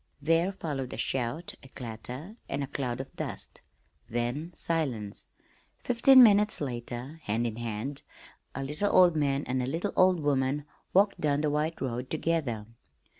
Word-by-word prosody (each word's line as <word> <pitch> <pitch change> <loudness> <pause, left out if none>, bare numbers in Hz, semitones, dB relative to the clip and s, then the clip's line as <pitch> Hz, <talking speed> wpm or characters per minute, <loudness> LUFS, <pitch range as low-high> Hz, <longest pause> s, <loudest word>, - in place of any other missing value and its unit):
There 165 +5 +2
followed 145 -9 -4
a - - -5
shout, 135 +7 -2
a 135 - -13
clatter, 125 - -7
and 140 - -1
a - - -1
cloud 130 -3 -3
of 135 - -7
dust - - -5 0.5
then 120 +8 -2
silence. 130 -14 -2 0.5
Fifteen 250 +2 +7
minutes 210 -1 +5
later, 125 +2 -5
hand 110 +3 0
in 115 -1 -3
hand, 120 +4 -4 0.5
a 135 - -3
little 150 +9 -1
old 180 -3 +6
man 140 -2 +1
and 130 0 -1
a 125 - -2
little 170 +9 -2
old 185 -1 +5
woman 140 -1 0 0.3
walked 200 +2 +3
down 145 -1 +2
the 150 -1 +1
white 155 +2 -1
road 125 0 -3
together. 150 -9 -1
140 Hz, 155 wpm, -29 LUFS, 125-165 Hz, 0.5 s, Fifteen